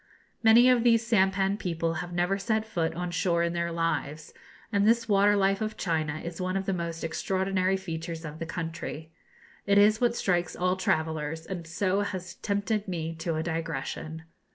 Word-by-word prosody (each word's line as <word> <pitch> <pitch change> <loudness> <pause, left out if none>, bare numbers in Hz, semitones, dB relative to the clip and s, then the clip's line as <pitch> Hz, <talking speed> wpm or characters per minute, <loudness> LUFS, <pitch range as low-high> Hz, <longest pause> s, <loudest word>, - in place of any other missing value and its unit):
Many 230 +2 +7
of 250 -2 +4
these 230 -1 +4
sampan 195 -2 +2
people 165 -3 -1
have 175 0 -7
never 175 +3 0
set 220 +1 0
foot 165 -7 -2
on 180 0 -3
shore 175 -1 +1
in 170 0 0
their 170 0 -1
lives, 165 -2 -2 0.4
and 200 -1 +3
this 230 0 +3
water 205 0 +4
life 195 0 +2
of 215 0 -3
China 155 -3 -1
is 170 +1 -6
one 185 +1 -1
of 195 - -3
the 195 - 0
most 170 -2 -4
extraordinary 190 +3 0
features 165 -2 -5
of 155 +1 -7
the 165 - -4
country. 165 -2 -5 0.6
It 200 0 +4
is 215 +2 +5
what 240 -1 +2
strikes 175 -6 0
all 180 +1 +1
travellers, 160 -3 -1
and 175 -3 -6
so 185 +3 0
has 185 -2 -4
tempted 205 +1 -1
me 165 -3 -3
to 165 0 -2
a 160 - -1
digression. 160 -1 -4
180 Hz, 180 wpm, -28 LUFS, 165-200 Hz, 0.6 s, Many